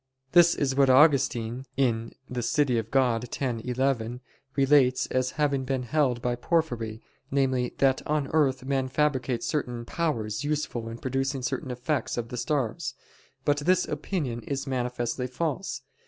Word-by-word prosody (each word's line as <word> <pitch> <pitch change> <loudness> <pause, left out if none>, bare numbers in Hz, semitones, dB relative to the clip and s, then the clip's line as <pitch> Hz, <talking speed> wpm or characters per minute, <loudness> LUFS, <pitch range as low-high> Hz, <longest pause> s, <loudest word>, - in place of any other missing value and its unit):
This 175 0 +6
is 135 -2 0
what 135 0 +4
Augustine 130 -3 +3
(De 125 0 -1
Civ. 145 +5 +2
Dei 125 -4 +1
x, 120 0 0
11) 125 -1 -1 0.3
relates 135 -2 +4
as 130 0 0
having 140 -3 +1
been 130 -1 -1
held 125 -3 +1
by 125 - +1
Porphyry, 120 -5 -1 0.3
namely, 130 -2 0
that 135 -1 +3
"on 150 -2 0
earth 135 -4 +2
men 135 -1 0
fabricate 130 -3 0
certain 125 -6 -2
powers 115 -10 -2
useful 145 -6 -2
in 115 - -6
producing 135 +1 -2
certain 135 0 -2
effects 125 +4 -2
of 115 -1 -3
the 125 - -5
stars." 135 -4 -1 0.5
But 145 0 +3
this 175 +5 +2
opinion 145 -5 -3
is 135 +2 -3
manifestly 125 -1 -2
false. 140 +1 -3
130 Hz, 140 wpm, -27 LUFS, 120-145 Hz, 0.5 s, This